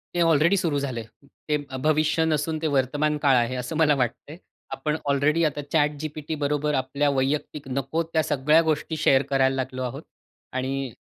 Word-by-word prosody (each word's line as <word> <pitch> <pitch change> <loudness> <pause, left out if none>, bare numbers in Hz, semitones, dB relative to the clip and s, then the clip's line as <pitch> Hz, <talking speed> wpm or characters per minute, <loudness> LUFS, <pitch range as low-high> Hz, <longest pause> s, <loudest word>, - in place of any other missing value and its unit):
ते 175 - +1
ऑलरेडी 165 +3 +4
सुरु 160 -6 0
झालंय. 130 -5 -3 0.5
ते 150 - +3 0.3
भविष्य 155 +1 +2
नसून 155 0 0
ते 160 - 0
वर्तमान 145 +3 +1
काळ 135 -2 +5
आहे 120 +1 +1
असं 125 +6 -6
मला 150 -2 +4
वाटतंय. 145 +6 -4 0.3
आपण 150 0 -2
ऑलरेडी 145 +4 +2
आता 145 -1 -1
ChatGPT 150 0 -1
बरोबर 150 +1 0
आपल्या 140 +2 0
वैयक्तिक 140 +1 -2
नको 140 +5 -2
त्या 165 -1 0
सगळ्या 150 +3 +3
गोष्टी 160 0 -1
शेअर 135 -3 +4
करायला 135 -1 +2
लागलो 130 0 -3
आहोत. 125 - -5 0.5
आणि 130 -1 -3
145 Hz, 160 wpm, -25 LUFS, 135-155 Hz, 0.5 s, काळ